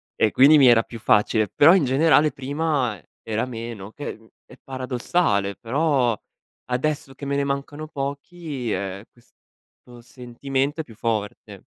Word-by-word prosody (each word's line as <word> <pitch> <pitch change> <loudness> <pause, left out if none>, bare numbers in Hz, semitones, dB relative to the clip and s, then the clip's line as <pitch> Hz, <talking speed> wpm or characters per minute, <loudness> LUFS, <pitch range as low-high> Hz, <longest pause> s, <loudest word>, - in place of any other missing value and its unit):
e 110 - +2
quindi 145 +3 +6
mi 135 - +7
era 115 -2 +6
più 115 - -10
facile. 105 0 +2
Però 150 - +6
in 185 -7 +3
generale 150 +3 +3
prima 140 -4 -2
e - - -27 0.2
era 110 +2 -2
meno 115 -4 -7
che 145 +5 -7
è - - -13
mhmm, 110 0 -21 0.2
è - - -15
paradossale; 125 - -1
però, 130 - +1 0.5
adesso 135 +1 -2
che 140 - -8
me 140 0 -1
ne 140 0 0
mancano 140 +2 -4
pochi, 140 -2 -5
ehm, 95 0 -3
questo 120 0 -21
sentimento 135 +5 -3
è - - -7
più 115 -7 -16
forte. 110 -2 -4
130 Hz, 160 wpm, -23 LUFS, 115-145 Hz, 0.5 s, mi